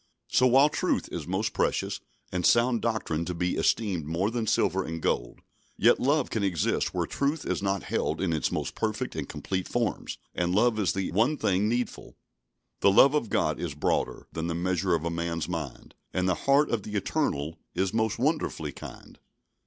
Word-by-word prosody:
So, 130 - +4
while 135 +4 +6
truth - - -1
is - - -5
most - - -1
precious, - - 0 0.3
and 90 -1 -2
sound 120 +4 +4
doctrine 110 -9 -1
to 90 - -3
be 90 +1 0
esteemed 95 -9 +1
more 90 +7 0
than 115 -2 -2
silver 95 -1 +2
and 80 -1 -5
gold, - - -2 0.4
yet - - +5
love 140 +1 +1
can 110 - -1
exist 90 -6 0
where - - -1
truth 145 +3 -1
is - - -1
not 100 -1 -1
held - - -1
in 90 -4 0
its 80 - 0
most - - -2
perfect - - -2
and - - -4
complete 95 -1 -3
forms, 120 -2 -2 0.2
and 90 +1 0
love 110 +1 +3
is 100 - +1
the 95 -1 -2
one 120 - +2
thing 100 -1 +1
needful. 120 +1 -3 0.6
"The - - +5
love 135 +8 +7
of 145 -8 0
God - - +1
is 85 -5 -4
broader 75 - -1
Than 80 +1 -3
the 85 - -2
measure 90 +1 +1
of 80 - -3
man's 85 0 -2
mind: 80 -8 -6 0.2
And 90 0 0
the 90 - +3 0.2
heart 140 +2 +5
of 115 - 0
the 105 +1 -7
Eternal 80 -5 -1 0.2
Is 95 +1 0
most 110 -1 +1
wonderfully 125 - -1
kind." - - -11
95 Hz, 190 wpm, -28 LUFS, 85-115 Hz, 0.6 s, love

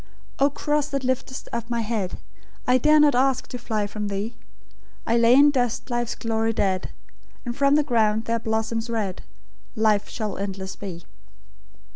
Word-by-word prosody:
"O 280 +1 +5
Cross, 295 +1 -1
that 275 -2 -3
liftest 260 0 -2
up 235 0 -3
my 235 -1 0
head, 215 -4 -2 0.5
I 250 +1 +4
dare 305 +4 +5
not 295 -1 +5
ask 260 +1 +2
to 250 - -6
fly 220 -3 -1
from 210 0 -4
Thee; 200 +3 -3 0.7
I 230 - +1
lay 235 +1 +6
in 290 +2 +7
dust 245 -1 -1
life's 240 -1 -1
glory 225 0 -1
dead, 190 -3 0 0.6
And 240 -1 -3
from 280 +1 +3
the 300 - +4
ground 220 -5 +1
there 230 0 0
blossoms 225 +1 -2
red 210 -5 -2 0.5
Life 215 -2 +2
that - - -14
shall 215 -5 -4
endless 195 -1 -4
be." 175 -4 -7
230 Hz, 170 wpm, -24 LUFS, 210-260 Hz, 0.7 s, in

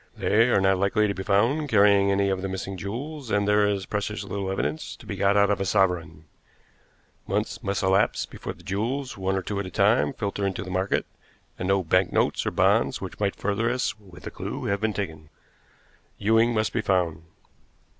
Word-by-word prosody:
They 115 +4 +3
are 120 - +4
not 95 -1 +2
likely 105 +2 +2
to 100 - -1
be 95 - -6
found 115 +10 +1
carrying 100 -2 +5
any 100 0 +2
of 95 -1 -1
the 95 - -3
missing 95 +1 -4
jewels, 125 - -6
and 100 -1 +1
there 105 0 +4
is 100 -2 -1
precious 105 +1 -3
little 100 -1 -4
evidence 80 -5 -3
to - - -16
be - - -5
got 100 +1 +2
out 100 0 +4
of 100 - 0
a - - +2
sovereign. 90 -5 0 1.0
Months - - -2
must 100 0 -2
elapse 95 +1 +2
before - - -7
the 90 - -19
jewels, 120 +8 -2
one 95 0 -1
or 95 - -2
two 100 +2 -3
at 100 - -3
a - - -6
time, 75 -4 +3
filter 100 0 -3
into 95 -1 -3
the 95 - -8
market, 95 +2 0 0.5
and 90 - -2
no 95 -1 +2
banknotes 90 +2 +1
or - - +3
bonds - - +2
which - - -8
might 100 -1 0
further 105 +3 -1
us 125 +1 -1
with 95 -4 -15
a - - -5
clew - - -5
have 100 0 -1
been 110 -1 0
taken. 80 -7 -5 0.9
Ewing 115 +3 +3
must 110 -2 0
be 115 - 0
found." 90 -6 0
100 Hz, 205 wpm, -25 LUFS, 95-105 Hz, 1.0 s, carrying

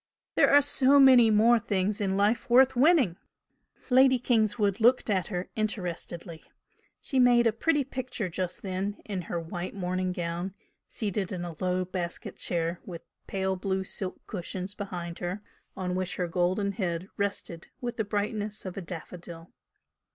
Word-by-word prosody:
There - - +4
are 285 0 +6
so 275 0 +5
many 255 -4 +7
more 225 +3 +5
things 205 -1 -1
in 195 -1 0
life 210 +5 +1
worth 260 +2 +6
winning!" 260 - +4 0.7
Lady 260 +1 +6
Kingswood 215 -4 +1
looked 240 0 +4
at 185 -3 +1
her 180 0 -4
interestedly. 175 -6 -4 0.6
She 270 - 0
made 245 -1 +5
a 225 - +3
pretty 295 +5 +1
picture 255 -5 -4
just 180 +5 -4
then 195 +1 -3
in 195 -3 -3
her 170 0 -4
white 175 +3 -6
morning 185 -1 -1
gown, 175 +2 -4 0.3
seated 205 -3 -2
in 175 -2 -4
a 170 -2 -7
low 185 0 0
basket 175 -2 -5
chair 170 0 -1
with 170 -3 -8 0.2
pale 190 0 -1
blue 190 0 -2
silk 190 0 -5
cushions 185 0 -5
behind 175 -4 -6
her 180 +4 -4 0.3
on 180 -1 -2
which 185 0 -2
her 180 - -1
golden 185 +3 0
head 180 -3 -3
rested 200 -4 -3
with 240 -1 -4
the 220 - +1
brightness 205 0 -3
of 185 - -5
a - - -3
daffodil. 170 0 -9
195 Hz, 160 wpm, -28 LUFS, 180-225 Hz, 0.7 s, many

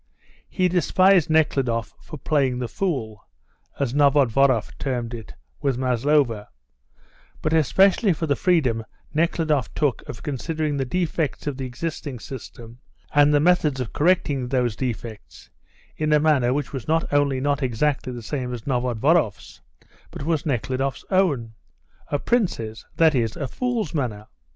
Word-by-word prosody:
He 185 - +1
despised 180 -1 +3
Nekhludoff 135 -8 +1
for 155 - -9
"playing 135 -3 +1
the 125 -1 -3
fool," 115 - -3 0.5
as 135 -3 -1
Novodvoroff 135 -4 +3
termed 120 -3 -3
it, 115 -2 -9 0.3
with 135 -4 0
Maslova, 125 -3 +1 0.9
but 155 - 0
especially 190 - +4
for 165 0 -1
the 145 -2 +1
freedom 135 -12 +1 0.3
Nekhludoff 155 -4 +1
took 145 -5 0
of 115 - -8
considering 150 +2 -2
the 135 -1 -1
defects 160 -1 -2
of 145 -3 -3
the 130 -1 -4
existing 145 0 -5
system 120 -1 -10 0.3
and 145 0 +5
the 145 - +4
methods 155 -4 +2
of 125 -4 -4
correcting 145 -6 +1
those 125 -4 0
defects 115 - -6 0.4
in 155 0 -1
a 150 - +5
manner 145 -5 +3
which 145 0 -2
was 130 -5 -5
not 160 +1 +2
only 140 -2 +2
not 140 +1 0
exactly 130 +2 0
the 120 -2 -7
same 125 +2 -3
as 115 - -10
Novodvoroff's, 125 - 0 0.5
but - - -8
was 160 -2 0
Nekhludoff's 130 +1 -2
own 145 -13 +1 0.5
a 145 - 0
prince's, 140 - -1
that 160 -1 +4
is, 115 -4 0
a 140 - -3
fool's 235 - -2
manner. 115 -9 -2
140 Hz, 145 wpm, -23 LUFS, 120-155 Hz, 0.9 s, and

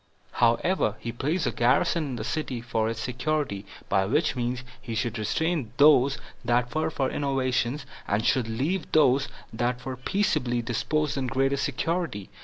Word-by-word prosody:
However, 120 - +2
he 115 - -5
placed 150 +8 -1
a - - +1
garrison 130 +7 +2
in 135 -3 -4
the 110 - -4
city 130 0 -2
for 115 -2 -1
its 115 0 -4
security, 125 -4 -2 0.2
by 95 0 +2
which 145 +6 +1
means 125 0 -2 0.2
he 115 -3 -5
should 120 0 -1
restrain 150 - -1
those 140 -2 +6 0.3
that 120 0 +1
were 155 0 +1
for 135 -4 -1
innovations, 135 -1 0 0.2
and 105 +3 0
should 125 -4 +2
leave 145 +10 -2
those 140 -2 +4 0.3
that 120 +2 -1
were 130 -1 -4
peaceably 125 - 0
disposed 145 +5 0
in 130 - -1
greater 135 +2 +1
security. 140 - -2
130 Hz, 160 wpm, -27 LUFS, 120-150 Hz, 0.3 s, those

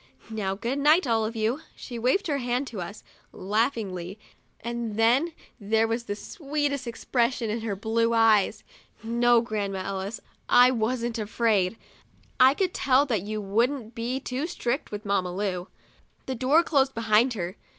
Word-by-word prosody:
Now, 195 -3 -2
good 240 +7 -2
night, 305 +4 +5
all 225 -3 +1
of 225 +2 -4
you!' 225 +5 0 0.2
She 240 -3 -7
waved 260 - +1
her 285 -4 0
hand 250 +2 -1
to 205 -6 -6
us, 200 +5 -8 0.3
laughingly, 200 -3 -2 0.4
and 235 -2 -4
then 250 +9 +3 0.3
there 220 +2 +2
was 230 +1 -2
the 205 - -3
sweetest 285 - -3
expression 235 -1 -1
in 225 +1 -2
her 220 -3 -2
blue 225 +3 0
eyes. 225 -3 +3 0.4
No, 235 +1 +3
Grandma 200 -4 -3
Ellis, 195 +3 -4 0.3
I 245 +1 +7
wasn't 235 0 -1
afraid; 215 -2 +1 0.6
I 260 +2 +7
could 370 0 0
tell 270 +1 +3
that 230 -8 0
you 215 +2 -4
wouldn't 230 +4 0
be 245 +2 -2
too 270 +3 -3
strict 270 -5 -2
with 210 +1 -7
Mamma 190 -3 0
Lu. 190 -2 -2 0.6
The 265 - -3
door 265 +7 +3
closed 270 -5 +1
behind 230 +2 +3
her. 180 -2 -4
230 Hz, 160 wpm, -26 LUFS, 210-255 Hz, 0.6 s, I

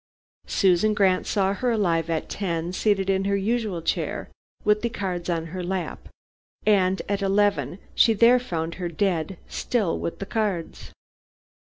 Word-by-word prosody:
Susan 195 +2 +3
Grant 190 -3 +2
saw 195 -2 +1
her 250 +5 -1
alive 170 -8 +1
at 160 -1 -1
ten, 170 -3 -3
seated 195 -1 +1
in 195 0 +1
her 200 0 +1
usual 205 -4 -1
chair - - -2 0.3
with 210 0 +3
the 235 - 0
cards 180 -5 -4
on 165 -2 -1
her 185 -1 -4
lap, 185 0 -4 0.6
and 190 -3 +3
at 200 0 -1
eleven, 200 -1 +1 0.2
she 225 - +5
there 235 +4 +5
found 170 -8 -3
her 175 - -1
dead, 170 0 -1
still 215 -9 -1
with 170 - -4
the 195 - -5
cards. 200 -6 -3
195 Hz, 155 wpm, -25 LUFS, 175-210 Hz, 0.6 s, she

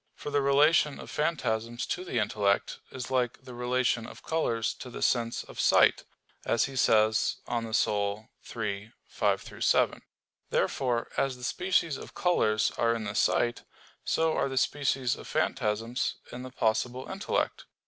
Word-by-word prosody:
For 145 - -6
the 145 0 +2
relation 145 +2 +4
of - - -9
phantasms 120 -7 -1
to 180 - -3
the 175 - -3
intellect 105 -2 +1
is 130 0 -7
like 125 -2 0
the 125 - -10
relation 125 -1 0
of - - -12
colors 115 -9 0
to 125 - -7
the - - -5
sense 115 -1 +1
of - - -12
sight, - - +4 0.4
as 115 - +2
he 135 - -7
says 110 -3 +3
De - - -9
Anima 115 -1 -1
iii, 105 0 -2 0.2
5,7. - - +1 0.5
Therefore, 120 -3 0
as 135 -2 0
the 125 - -12
species 170 -1 +1
of - - -11
colors 110 -12 +2
are 115 0 +3
in 115 - -4
the 100 -1 -4
sight, 120 +2 +1 0.4
so 160 -1 +1
are - - 0
the 135 - -4
species 135 -2 +1
of - - -11
phantasms 115 +4 -1 0.2
in 125 - -7
the 130 - -7
possible 125 +1 -1
intellect. 195 +1 -2
120 Hz, 155 wpm, -29 LUFS, 110-135 Hz, 0.5 s, relation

